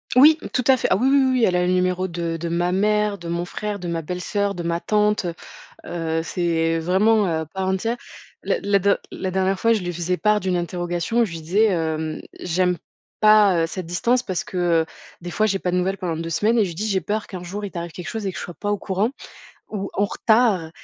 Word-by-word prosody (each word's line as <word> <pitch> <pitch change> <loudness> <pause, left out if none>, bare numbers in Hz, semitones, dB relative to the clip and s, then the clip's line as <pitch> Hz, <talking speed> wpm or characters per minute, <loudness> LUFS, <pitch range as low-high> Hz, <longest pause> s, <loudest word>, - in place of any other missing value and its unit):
Oui! 305 +5 +7
Tout 250 - +1
à 265 - +7
fait. 255 - -1
Ah - - +3
oui 250 +6 +2
oui 275 +1 +5
oui 260 - +2
oui, 250 -2 +2
elle 180 - +1
a 180 0 +2
le - - +2
numéro 185 0 +1
de 170 -1 -3
de 170 +1 -4
ma 175 +1 0
mère, 210 +1 +1
de 170 - -8
mon 170 +1 -2
frère, 210 +3 -4
de 180 -3 -6
ma 170 -1 -2
belle 180 +3 -5
sœur, 200 +1 -1
de 175 - -4
ma 170 0 -1
tante 210 0 +1
heu. 170 - -2 0.5
Heu, 165 -1 -2
c'est 165 -1 0
vraiment, 200 +6 +3
heu, 165 -3 0
à 160 - -3
part 190 +4 -3
entière. 225 +6 -1 0.5
La - - 0
la 200 0 +3
der 200 +1 +2
la 190 - -4
dernière 190 +1 0
fois 230 0 +4
je 215 - 0
lui 175 0 -3
faisais 175 +1 -2
part 210 +1 +3
d'une 185 -2 0
interrogation 175 +5 -1
où - - +4
je 195 - -8
lui 165 -1 -6
disais, 190 +8 +2
hem: 160 -2 -2 0.2
«J'aime 180 +1 +1 0.4
pas, 210 -5 +5
heu, - - 0
cette 185 +1 -5
distance» 235 +9 +1
parce 185 -3 -2
que, 185 - -7 0.3
heu, - - -10 0.4
des 175 +1 -6
fois 215 +3 +2
j'ai 195 -2 0
pas 180 - -1
de - - 0
nouvelles 190 +2 0
pendant 175 -4 -3
2 165 0 -4
semaines 215 +8 +2
et 215 - +4
je - - -4
lui 170 - -8
dis: 210 +6 -2
«J'ai 190 -2 +1
peur 210 +5 -2
qu'un 185 -2 -7
jour 200 +4 -5
il 200 - -6
t'arrive 170 -1 -5
quelque 180 +2 -8
chose 220 -3 -4
et - - -1
que 175 - -9
je - - -5
sois 175 - -7
pas 205 - -2
au 205 - +1
courant, 195 +5 0 0.6
ou 200 -2 -4
en 200 - +2
retard» 215 -7 +2
185 Hz, 260 wpm, -22 LUFS, 170-210 Hz, 0.6 s, Oui